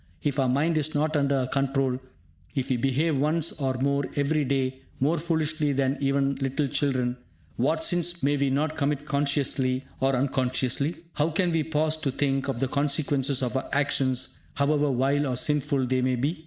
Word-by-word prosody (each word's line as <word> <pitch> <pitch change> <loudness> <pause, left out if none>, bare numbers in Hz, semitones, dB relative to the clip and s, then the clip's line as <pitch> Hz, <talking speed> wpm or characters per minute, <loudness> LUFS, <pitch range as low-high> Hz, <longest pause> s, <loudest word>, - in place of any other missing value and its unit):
If 145 -1 0
our 130 -2 +2
mind 155 +5 +2
is 155 +1 -2
not 155 +2 +1
under 140 -1 +2
our 125 - -1
control, 135 -1 0 0.6
if 135 0 -1
we 125 - +2
behave 135 +5 +1
once 155 +3 +1
or 130 -1 0
more 140 +2 +1
every 145 +1 +1
day 130 -1 -1 0.2
more 155 +6 +2
foolishly 155 -2 0
than 135 +1 +1
even 140 0 +1
little 135 +2 0
children, 130 -3 0 0.4
what 155 +6 +1
sins 175 0 0
may 145 +1 +3
we 140 -1 +1
not 150 +4 0
commit 145 -1 -1
consciously 140 -3 0
or 135 0 +2
unconsciously? 130 +3 0 0.2
How 150 +2 +1
can 175 +2 +1
we 165 -1 +2
pause 155 0 0
to 155 -3 -2
think 135 0 0
of 135 -4 -2
the 135 - +1
consequences 140 -1 0
of 125 0 -2
our 130 - -2
actions, 135 -3 0 0.2
however 145 +1 +2
vile 140 +3 +1
or 125 -2 -1
sinful 145 -1 +1
they 130 0 +1
may 130 0 +1
be? 145 +7 -1
140 Hz, 180 wpm, -26 LUFS, 130-150 Hz, 0.6 s, may